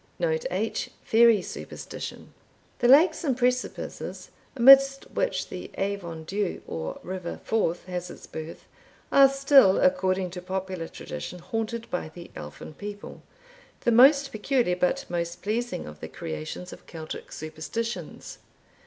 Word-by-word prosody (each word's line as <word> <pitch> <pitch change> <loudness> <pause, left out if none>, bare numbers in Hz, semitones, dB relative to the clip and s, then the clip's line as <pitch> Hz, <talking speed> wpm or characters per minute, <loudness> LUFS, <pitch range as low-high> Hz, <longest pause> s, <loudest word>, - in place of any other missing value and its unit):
Note 485 -1 0
H. - - -2
Fairy 225 -3 +5
Superstition. - - -8 0.5
The 245 - +3
lakes 305 +8 +6
and 265 -6 0
precipices 250 0 -2 0.2
amidst 275 +2 +7
which - - -1
the - - -7
Avon 190 -5 -3
Dhu, 200 +2 -2
or 80 -1 -5
River 180 -1 -5
Forth, 180 -7 0
has 180 -1 -4
its - - -11
birth, 160 +1 -8 0.5
are 275 -1 +8
still, 275 -7 +5
according 190 -10 +2
to 180 0 -7
popular 185 -2 -4
tradition, 180 - -7
haunted 225 +5 -4
by 180 -3 -2
the 170 +2 -12
Elfin 75 - -9
people, 205 +4 -8 0.6
the 240 - +2
most 275 +4 +6
peculiar, 220 -3 +1
but 180 0 0
most 170 0 -3
pleasing, 235 +4 -2
of 75 0 -10
the 80 - -6
creations 80 - -6
of - - -14
Celtic 160 -2 -8
superstitions. 160 +10 -5
200 Hz, 135 wpm, -26 LUFS, 175-250 Hz, 0.6 s, are